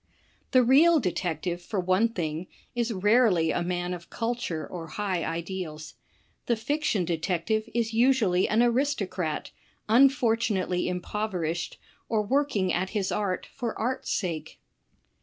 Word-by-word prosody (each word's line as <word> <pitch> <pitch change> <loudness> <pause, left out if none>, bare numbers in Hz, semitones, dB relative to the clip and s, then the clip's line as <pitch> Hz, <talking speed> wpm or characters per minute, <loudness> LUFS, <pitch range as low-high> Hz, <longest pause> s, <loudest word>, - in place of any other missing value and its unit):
The 255 -1 +5
real 305 +7 +6
detective, 175 - -2
for 195 +3 -3
one 185 +5 +2
thing, 170 -4 -3 0.3
is 240 -1 -1
rarely 205 -4 +3
a - - 0
man 175 0 -2
of 170 -1 -8
cul 230 +1 -1
ture 165 -10 -4
or 165 0 -7
high 190 -5 -1
ideals. 165 -2 -5 0.5
The 235 - +3
fiction 235 - 0
detective 180 +6 -1
is 230 -1 0
usually 225 -7 +3
an 225 +3 +4
aristocrat, 220 - -1 0.4
unfortunately 225 -7 +3
impoverished, 180 -2 -3 0.3
or 215 -2 +1
working 250 -6 +1
at 185 +2 0
his 195 -2 -1
art 200 -3 -1
for 240 -4 -3
art's 245 +4 -2
sake. 160 -5 -3
195 Hz, 130 wpm, -27 LUFS, 175-235 Hz, 0.5 s, real